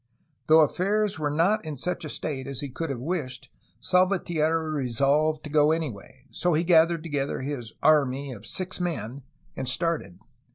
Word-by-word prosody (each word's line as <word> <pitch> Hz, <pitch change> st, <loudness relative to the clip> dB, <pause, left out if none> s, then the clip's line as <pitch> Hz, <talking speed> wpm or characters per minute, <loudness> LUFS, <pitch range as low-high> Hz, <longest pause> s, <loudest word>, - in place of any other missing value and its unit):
Though 160 Hz, +1 st, +7 dB
affairs 195 Hz, +5 st, +1 dB
were 150 Hz, -1 st, 0 dB
not 175 Hz, +9 st, +2 dB
in 155 Hz, -3 st, -6 dB
such 180 Hz, +7 st, -3 dB
a 155 Hz, -, -5 dB
state 135 Hz, -3 st, -4 dB
as 140 Hz, -2 st, -4 dB
he 140 Hz, -, -5 dB
could 165 Hz, +5 st, -4 dB
have 135 Hz, -, -2 dB
wished, 145 Hz, -2 st, -4 dB, 0.3 s
Salvatierra 165 Hz, -4 st, +1 dB
resolved 145 Hz, +3 st, +1 dB
to 150 Hz, -, -7 dB
go 150 Hz, 0 st, +4 dB
anyway; 135 Hz, -5 st, -4 dB
so 175 Hz, -1 st, 0 dB
he 160 Hz, -, +2 dB
gathered 165 Hz, -1 st, +4 dB
together 145 Hz, -5 st, -2 dB
his 130 Hz, -5 st, -5 dB
*'army'' 140 Hz, -3 st, +3 dB
of 105 Hz, 0 st, -12 dB
six 185 Hz, -, -4 dB
men 140 Hz, -7 st, -3 dB, 0.3 s
and 130 Hz, -, -3 dB
started. 165 Hz, -, -2 dB
155 Hz, 165 wpm, -26 LUFS, 135-170 Hz, 0.3 s, Though